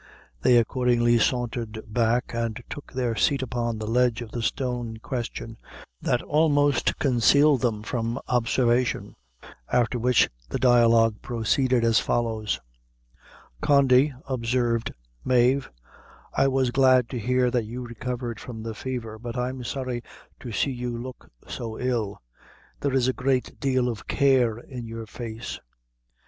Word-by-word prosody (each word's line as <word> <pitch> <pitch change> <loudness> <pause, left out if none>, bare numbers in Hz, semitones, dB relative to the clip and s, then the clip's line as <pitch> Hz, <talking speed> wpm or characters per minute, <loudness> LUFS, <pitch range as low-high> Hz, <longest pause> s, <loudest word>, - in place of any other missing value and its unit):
They 120 - +5
accordingly 120 0 +3
sauntered 120 -3 -1
back, 115 +3 0
and 115 0 -2
took 145 - -8
their 125 -3 -1
seat 135 +3 +2
upon 120 -2 -2
a 110 - -4
ledge 120 +1 +1
of 110 - -11
the 120 - -4
stone 125 0 -2
in - - -12
question, 115 -1 -5 0.4
that 125 - 0
almost 145 -2 +2
concealed 140 +2 +4
them 110 -4 0
from 115 +1 -2
observation; 120 0 +1 0.6
after 120 0 +2
which 125 +1 +4 0.2
the - - -2
dialogue 115 -3 +4
proceeded 120 +2 +1
as 115 -1 +4
follows: 110 -3 -1 1.0
"Condy," 140 0 +4 0.2
observed 120 -2 0 0.3
Mave, 130 +2 +3 0.6
"I 135 - +3
was 130 -2 +1
glad 130 -2 +4
to 125 - -4
hear 125 +2 +1
that 120 -3 0
you 120 +3 -6
recovered 120 0 -5
from 110 -3 -8
the 115 0 -4
fever; 115 -3 -5
but 120 +1 -6
I'm 125 +1 -3
sorry 125 -1 -3 0.4
to 120 - -7
see 125 +6 0
you 120 -1 -4
look 125 +1 -9 0.2
so 115 -2 -5
ill: 115 -5 -1 0.6
there 140 -2 -1
is 130 -2 +3
a 130 - +2
great 130 0 -1
deal 130 -2 +1
of 115 -4 -5
care 130 -5 +3
in 120 -1 -8
your 115 0 -6
face." 115 +1 -7
120 Hz, 140 wpm, -25 LUFS, 115-130 Hz, 1.0 s, They